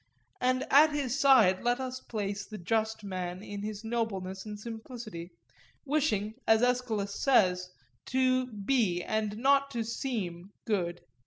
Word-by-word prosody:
And 255 +1 +1
at 295 +2 +7
his 275 -2 -1
side 230 -10 +6
let 245 +1 +1
us 255 -1 -4
place 205 -3 -4
the 215 - -7
just 220 +4 -1
man 185 -1 -4
in 205 -1 -6
his 210 0 -5
nobleness 210 -4 -3
and 210 -1 -6
simplicity, 220 -5 -7 0.6
wishing, 245 -8 0
as 220 +1 +5
Aeschylus 240 -5 0
says, 180 -9 +3 0.4
to 255 -1 +2
be 210 -5 0
and 215 -1 -2
not 275 +3 +3
to 235 -4 -2
seem 205 -6 -4
good. 175 -5 -1
220 Hz, 140 wpm, -30 LUFS, 200-255 Hz, 0.6 s, at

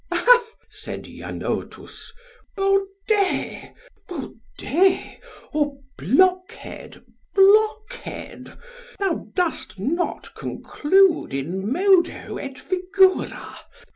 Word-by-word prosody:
Ha, 485 -1 +5 0.2
said - - -8
Janotus, - - -6 0.5
baudet, 390 +1 0 0.4
baudet, 335 +3 -1 0.3
or 295 -2 0 0.2
blockhead, 370 - 0 0.3
blockhead, 430 +4 +1 0.4
thou 390 -4 -2
dost 350 - -2
not 315 - -2
conclude 370 - +1
in 185 - -3
modo 365 +2 +2
et 270 -1 -7
figura. 375 +2 +1
370 Hz, 70 wpm, -23 LUFS, 295-390 Hz, 0.5 s, Ha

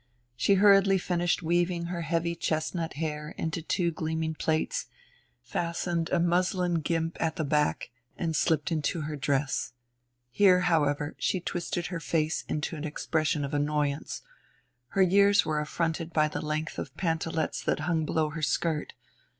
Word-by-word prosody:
She 200 - +3
hurriedly 195 -1 +6
finished 175 -1 0
weaving 175 +1 +1
her 175 0 -3
heavy 170 +1 0
chestnut 160 0 -2
hair 150 0 -4
into 160 +1 -2
two 170 +1 0
gleaming 160 0 -2
plaits, 155 0 -1 0.6
fastened 170 - -2
a 180 - +2
muslin 175 0 +1
guimpe 165 +1 -1
at 160 -1 0
the 160 - -1
back, 150 -3 0 0.3
and 165 -2 -1
slipped 160 0 +1
into 160 +1 0
her 150 0 -4
dress. 140 -3 -1 0.6
Here, 180 +5 +5
however, 150 -4 +1
she 185 - +1
twisted 175 0 -3
her 165 - -2
face 160 -1 -1
into 150 +2 -2
an 150 - -6
expression 155 -1 -1
of 140 - -6
annoyance 145 0 -1 0.6
her 195 +9 +3
years 200 +2 +5
were 155 -1 0
affronted 165 +2 -2
by 155 -1 +3
the 150 - -4
length 155 +1 -3
of - - -7
pantalets 160 -2 -1
that - - 0
hung 160 0 0
below 155 0 0
her 160 +1 -5
skirt. 150 +1 0
160 Hz, 150 wpm, -28 LUFS, 155-175 Hz, 0.6 s, hurriedly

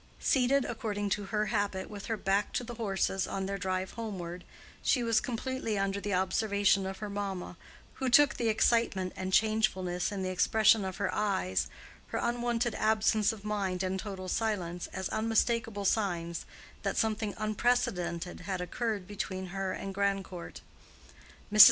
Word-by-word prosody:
Seated 270 +1 +3
according 210 -3 -2
to 205 0 0
her 210 +1 0
habit 200 -3 0
with 205 -2 -8
her 225 -2 -1
back 195 +1 +1
to - - 0
the 240 0 -6
horses 195 -4 0
on 195 -1 -2
their 195 +1 -3
drive 185 0 -1
homeward, 180 -6 -5 0.4
she 250 - +2
was 230 -1 +3
completely 245 -2 -2
under 195 0 0
the 205 - -3
observation 200 +1 +2
of 190 0 -5
her 210 - -5
mamma, 200 -3 -4 0.5
who 260 - +2
took 290 +3 +6
the 235 - -1
excitement 215 -4 +2
and 185 0 -3
changefulness 190 -5 +2
in 195 -2 -3
the 185 - -1
expression 215 +3 +4
of 190 -1 -4
her 200 -2 -1
eyes, 95 - 0 0.4
her - - -3
unwonted 240 -1 0
absence 215 -1 +3
of 215 -2 -10
mind 195 -3 -1
and 190 0 -1
total 190 -2 -5
silence, 180 -4 -1
as 190 - -4
unmistakable 225 -1 +1
signs 175 -5 0 0.3
that - - -2
something 215 -2 0
unprecedented 185 -6 0
had 185 0 -3
occurred 205 +2 -2
between 190 -2 -4
her 195 -1 -1
and 195 +1 -5
Grandcourt. 195 -3 -2 0.9
Mrs. 215 - +2
200 Hz, 160 wpm, -31 LUFS, 190-220 Hz, 0.9 s, took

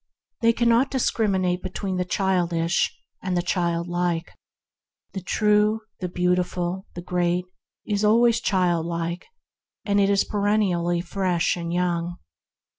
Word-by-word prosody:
They 230 0 +5
cannot 235 +3 +3
discriminate 190 -8 0
between 185 0 -4
the 180 - 0
childish 175 -3 0 0.2
and 185 -1 -1
the 175 - 0
child 170 -2 0
like. 175 -1 -1 0.8
The 190 - -4
True, 210 +3 +2 0.2
the 180 - -3
Beautiful, 180 +1 -1
the 175 - -6
Great, 180 0 0 0.4
is 205 -1 -1
always 230 +2 +4
childlike, 170 -2 -1 0.6
and 205 -1 +2
is 200 0 +3
perennially 195 -5 +1
fresh 180 -1 0
and 170 -1 -4
young. 175 -1 -1
180 Hz, 115 wpm, -24 LUFS, 175-205 Hz, 0.8 s, They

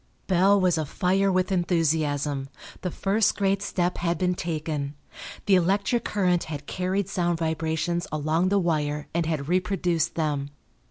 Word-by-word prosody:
Bell 195 +2 +4
was 180 -3 +2
afire 185 +6 +1
with 185 0 +1
enthusiasm; 155 -6 0 0.3
the 180 - -2
first 200 +5 +1
great 195 0 +1
step 180 -3 -1
had 170 -1 0
been 180 +1 +1
taken. 155 -4 -3 0.5
The 200 - +3
electric 200 +6 +2
current 180 -4 +1
had 145 -2 -6
carried 185 +4 -1
sound 175 -3 0
vibrations 160 +1 -1
along 155 +4 +1
the 200 - +3
wire 150 -5 0
and 170 -1 0
had 150 -4 -2
reproduced 180 -2 0
them. 145 -3 -1
175 Hz, 145 wpm, -26 LUFS, 155-185 Hz, 0.5 s, Bell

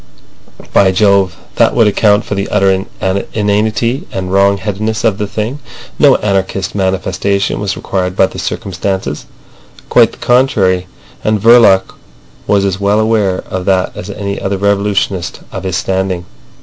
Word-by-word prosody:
By 95 - +5
Jove! 100 -1 +2 0.2
that - - +3
would 115 - +4
account 105 0 +2
for - - -4
the 100 0 -2
utter 95 -1 +2 0.5
inanity 110 +4 0
and 95 -1 -4
wrong 100 +1 +3
headedness 105 +3 -3
of 110 -4 +1
the 105 - -2
thing. 110 +7 -4 0.4
No - - +6
anarchist 95 -2 -1
manifestation 95 0 -1
was 100 -2 -2
required 90 -1 -2
by 95 - +4
the - - -7
circumstances. 95 -5 -3 0.6
Quite - - +4
the - - -13
contrary; 105 -8 +2 0.4
and 110 0 +1
Verloc 110 -4 +5 0.5
was 100 -1 +2
as 95 -1 -1
well 100 +1 +2
aware 110 -4 +1
of 95 -1 -4
that 95 -2 0
as 90 - -7
any 100 -1 -4
other 95 0 -2
revolutionist 100 -2 -1
of - - -6
his 90 -2 -1
standing. 95 -1 -2
100 Hz, 150 wpm, -13 LUFS, 95-105 Hz, 0.6 s, No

